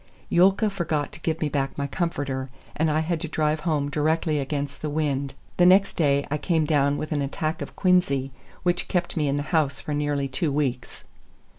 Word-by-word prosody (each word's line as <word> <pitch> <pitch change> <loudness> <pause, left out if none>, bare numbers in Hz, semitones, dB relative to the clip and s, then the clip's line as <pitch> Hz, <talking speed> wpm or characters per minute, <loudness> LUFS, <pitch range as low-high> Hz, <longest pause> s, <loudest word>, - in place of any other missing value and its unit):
Yulka 195 +5 +4
forgot 165 -6 -2
to - - -11
give 160 -1 -2
me 155 - +2
back 135 -2 -2
my 140 - -1
comforter, 140 -4 -2 0.3
and 160 +1 +1
I 155 +1 +2
had 160 0 -2
to 165 - -3
drive 155 0 0
home 150 -3 0
directly 155 +1 +1
against 140 0 -3
the 155 - -2
wind. 140 -3 -1 0.2
The 175 - +5
next 195 +2 +5
day 140 -3 +2
I 150 - 0
came 160 -2 +1
down 145 -1 +2
with 155 - -5
an 145 -2 0
attack 155 +3 -2
of - - -6
quinsy, 175 -8 +2 0.3
which 175 -1 0
kept 175 -1 -1
me 155 -3 +1
in 140 +1 +1
the 145 - -1
house 145 -4 +2
for 150 - -4
nearly 145 -1 0
two 140 +4 -1
weeks. 135 -3 -2
150 Hz, 200 wpm, -25 LUFS, 140-165 Hz, 0.3 s, The